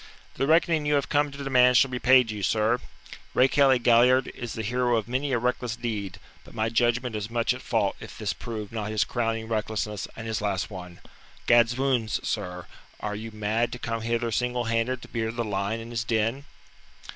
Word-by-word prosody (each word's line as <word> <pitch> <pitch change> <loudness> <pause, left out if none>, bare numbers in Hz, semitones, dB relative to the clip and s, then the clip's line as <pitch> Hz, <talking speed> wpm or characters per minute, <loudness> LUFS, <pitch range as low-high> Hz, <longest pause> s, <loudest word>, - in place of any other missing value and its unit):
"The 135 - -1
reckoning 160 -1 +3
you 150 - +3
have 140 - 0
come 145 0 +2
to 140 0 -8
demand 125 -2 +5
shall 135 +1 +4
be 125 - -3
paid 125 -3 +5
you, 105 -1 -5
sir. 110 +5 +2 0.6
Rakehelly 135 0 +5
Galliard 125 +2 +4
is 120 -2 -7
the 110 - -4
hero 120 +2 +1
of 110 - -3
many 130 +3 -1
a 125 - +2
reckless 125 -1 -1
deed, 110 -6 -4 0.3
but - - -16
my 110 0 0
judgment 120 +1 +1
is 105 0 -4
much 120 +1 +1
at 130 - -8
fault 105 -4 0
if - - -10
this - - -2
prove 110 -3 -6
not 110 -2 -4
his 110 -1 +2
crowning 115 -2 -2
recklessness 110 -2 -2
and 110 - -7
his 110 -2 -2
last 100 -1 -2
one. 90 -2 -9 0.4
Gadswounds, 120 -1 +3
sir, 90 -4 -3 0.3
are 105 -1 -3
you 110 +2 -6
mad 110 +2 -1
to - - -5
come 115 -2 -3
hither 115 +1 -1
single 125 +2 0
handed 115 +2 -1
to - - -10
beard 115 0 -3
the 120 - -1
lion 100 +2 -2
in 115 +1 -9
his 115 -1 -2
den?" 115 +4 -1
115 Hz, 200 wpm, -26 LUFS, 110-125 Hz, 0.6 s, demand